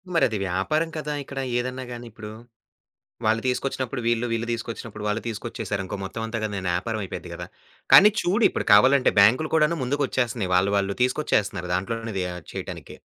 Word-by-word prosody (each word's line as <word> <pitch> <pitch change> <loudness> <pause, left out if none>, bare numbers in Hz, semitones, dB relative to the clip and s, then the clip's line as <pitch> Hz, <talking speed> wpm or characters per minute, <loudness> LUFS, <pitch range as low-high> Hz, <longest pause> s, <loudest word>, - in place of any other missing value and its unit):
మరది 110 -9 +3
వ్యాపారం 100 - 0
కదా! 150 -1 -3
ఇక్కడ 135 0 -7 0.2
ఏదన్నా 130 +1 -4
గాని 120 0 -7
ఇప్పుడు. 105 -1 -9 1.0
వాళ్ళు 115 +1 +2
తీసుకొచ్చినప్పుడు 130 0 -2
వీళ్ళు, 120 0 +1
వీళ్ళు 115 0 -1
తీసుకొచ్చినప్పుడు 115 -2 -6
వాళ్ళు, 105 +2 0
తీసుకొచ్చేశారనుకో 105 -4 -4
మొత్తం 115 +4 -5
అంతా 115 +1 -3
గానీ 105 -2 -3
ఏదన్నా 90 -1 -1 0.3
అయిపోద్ది - - -7
గదా! - - -7 0.5
కానీ, 210 +3 +10
చూడు 205 +6 +2
ఇప్పుడు - - -3
కావాలంటే 130 +5 +5
బ్యాం‌క్‌లు 125 +10 +4
కూడాను 160 +2 +2
ముందుకొచ్చేస్తున్నాయి, 125 -7 -1
వాళ్ళు 95 +2 +2
వాళ్ళు 100 0 -1
తీసుకొచ్చేస్తున్నారు, 105 - 0
దాంట్లోనే 115 +4 -3
అది 95 - 0
యా 90 - -5 0.2
చేయటానికి. - - -7
115 Hz, 155 wpm, -24 LUFS, 105-130 Hz, 1.0 s, కానీ